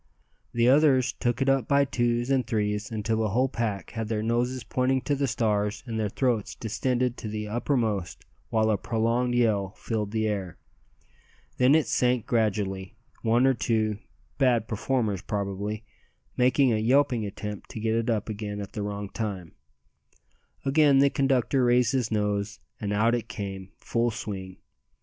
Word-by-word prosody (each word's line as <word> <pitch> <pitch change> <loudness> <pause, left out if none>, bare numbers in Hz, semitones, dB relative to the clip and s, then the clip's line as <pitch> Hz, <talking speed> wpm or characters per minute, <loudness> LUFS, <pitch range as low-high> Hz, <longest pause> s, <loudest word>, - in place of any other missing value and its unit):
The 120 0 +2
others 130 -3 +4
took 120 +2 -1
it - - -4
up 135 -2 +2
by 140 0 +4
twos 120 -1 0
and 130 -2 +2
threes, 105 -1 -1
until 110 0 -1
the 110 -1 0
whole 125 +6 +2
pack 110 -7 -3
had 110 -2 -4
their 110 -1 -1
noses 120 +3 0
pointing 130 +1 0
to 145 - -1
the 140 0 0
stars 105 -3 0
and 115 -3 -3
their 105 -1 0
throats 120 -2 -1
distended 125 +2 -1
to - - -6
the 105 0 -4
uttermost, 110 -5 -1 0.2
while 110 -1 +2
a 105 - +2
prolonged 120 +2 0
yell 105 -5 +1
filled 110 -3 -2
the 110 0 0
air. 95 -5 -3 1.0
Then 130 +3 +5
it 160 - +3
sank 125 -2 +1
gradually, 100 -5 -1 0.3
one 115 +3 +3
or 135 - +5
two 110 -3 0 0.4
(bad 120 -5 +3
performers 110 -3 -1
probably) 100 +2 -3 0.5
making 130 0 +3
a - - +2
yelping 120 +1 +2
attempt 105 0 -6
to - - -7
get 110 0 0
it 115 +1 0
up 110 -3 0
again 105 -1 -4
at 100 - -6
the 105 - -4
wrong 100 0 -4
time. 95 -5 -5 1.1
Again 140 0 +5
the 140 0 +5
conductor 135 -1 +2
raised 120 -1 +3
his 125 -5 0
nose, 105 0 -1 0.2
and 105 -2 -3
out 110 +3 +2
it 120 -2 -1
came 95 -3 -6
full 120 0 0
swing. 95 -5 -6
115 Hz, 165 wpm, -27 LUFS, 105-125 Hz, 1.1 s, Then